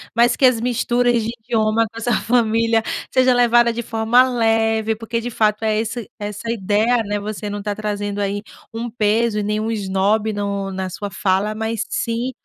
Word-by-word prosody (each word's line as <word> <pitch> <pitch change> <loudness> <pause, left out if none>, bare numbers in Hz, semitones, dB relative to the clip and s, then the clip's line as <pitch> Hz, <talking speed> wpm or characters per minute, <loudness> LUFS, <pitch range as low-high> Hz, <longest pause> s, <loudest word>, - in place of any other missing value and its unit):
mas 235 +1 +4
que 270 - +3
as 245 -3 +4
misturas 245 0 +1
de 225 - -3
idioma 225 -1 +1
na 230 - -7
sua 240 +1 0
família 230 -1 +2 0.3
seja 255 -1 +4
levada 240 -1 +4
de 235 - -3
forma 225 +1 +3
leve, 225 -2 +1
porque 225 +1 -3
de 235 +1 -4
fato 215 -2 0
é 215 -1 +1
esse 225 0 -4
essa 205 +1 -6
é - - 0
a - - +1
ideia, 220 +3 +1
né? 205 0 -2
Você 210 0 -5
não 205 0 -4
está 205 0 -3
trazendo 205 -1 -3
aí 200 0 -2 0.3
um 235 +1 -4
peso 220 -1 +1
e - - -1
nenhum 210 +2 -1
esnobe 205 +1 0
no 200 -1 -3
na 190 0 -4
sua 200 +3 -5
fala, 190 +2 0
mas 220 0 -2
sim 235 +2 -2
220 Hz, 195 wpm, -20 LUFS, 205-235 Hz, 0.3 s, mas